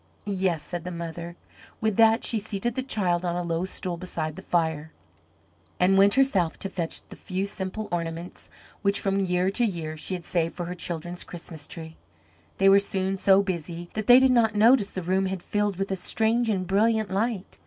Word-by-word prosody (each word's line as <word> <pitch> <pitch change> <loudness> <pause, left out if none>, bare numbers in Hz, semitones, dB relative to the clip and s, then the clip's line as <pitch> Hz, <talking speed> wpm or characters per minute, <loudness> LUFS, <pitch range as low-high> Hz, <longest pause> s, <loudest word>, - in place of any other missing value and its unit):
"Yes," 185 -6 0
said 175 +1 -5
the 180 - -5
mother. 170 0 -6 0.4
With 220 -2 0
that 225 +1 +5
she 225 - +1
seated 210 +2 -3
the 260 - -2
child 185 -9 0
on 175 -1 -1
a 175 - -1
low 170 +1 -1
stool 180 -2 -5
beside 160 -3 -4
the - - -8
fire, 160 -2 -1 0.9
and 185 +2 +4
went 200 +1 +5
herself 200 -12 +2
to 195 - -5
fetch 170 -4 -4
the - - -9
few 190 +1 -3
simple 200 +1 -4
ornaments 170 0 -5 0.3
which 200 -1 +2
from 195 0 0
year 180 0 +1
to 240 - 0
year 165 -8 -2
she 170 +4 -3
had 175 - -7
saved 165 -2 -1
for 175 - -4
her 175 - -4
children's 175 0 -4
Christmas 165 -3 -9
tree. 160 -1 -9 0.6
They 195 - +4
were 195 0 +8
soon 195 -1 -1
so 195 +1 +4
busy 175 -2 -5
that 215 -1 -4
they 245 +1 +9
did 265 0 +4
not 225 -4 +3
notice 220 0 +5
the 185 - -5
room 190 +2 +1
had 190 -2 -4
filled 205 -2 -1
with 195 0 -2
a - - +1
strange 225 +5 +1
and 190 -3 0
brilliant 215 +2 +2
light. 205 0 -2
190 Hz, 200 wpm, -26 LUFS, 170-205 Hz, 0.9 s, they